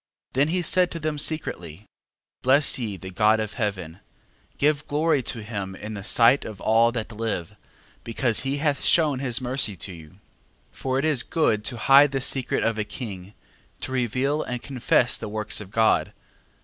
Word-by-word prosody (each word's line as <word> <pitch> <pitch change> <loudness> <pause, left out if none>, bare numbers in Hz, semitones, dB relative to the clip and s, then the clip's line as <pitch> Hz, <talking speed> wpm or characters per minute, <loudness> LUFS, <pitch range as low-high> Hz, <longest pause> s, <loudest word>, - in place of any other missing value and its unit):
Then 140 +3 +2
he 175 +2 -1
said 180 +2 +3
to 165 - -6
them 155 -1 -2
secretly, 105 - -2 0.6
Bless 135 +2 +4
ye 105 -5 -4
the 95 +1 -9
God 105 +3 +3
of 110 -1 -3
heaven, 95 -7 -4 0.6
give 150 +1 +1
glory 150 -1 +1
to 115 -2 -4
him 100 -3 -5
in 105 +3 -7
the 100 -2 -7
sight 120 +6 +4
of 105 -4 -8
all 115 +2 +3
that 115 -2 -4
live, 105 -4 -4 0.5
because 115 0 0
he 135 +1 -2
hath 145 -1 -1
shewn 150 -6 +2
his 130 -2 0
mercy 125 -5 0
to 90 +2 -6
you. 80 -3 -12
12:7. - - -22 0.5
For 130 0 -3
it 135 - 0
is 150 -6 +2
good 115 -11 0
to 120 - -2
hide 140 +4 +5
the 135 - 0
secret 130 -1 0
of 115 -1 0
a - - +1
king: 100 -3 -8 0.5
to - - -5
reveal 130 +4 0
and 125 -1 -5
confess 125 -2 +1
the - - -6
works 105 0 -2
of 100 - -10
God. 110 +1 +2
120 Hz, 185 wpm, -24 LUFS, 105-140 Hz, 0.6 s, hide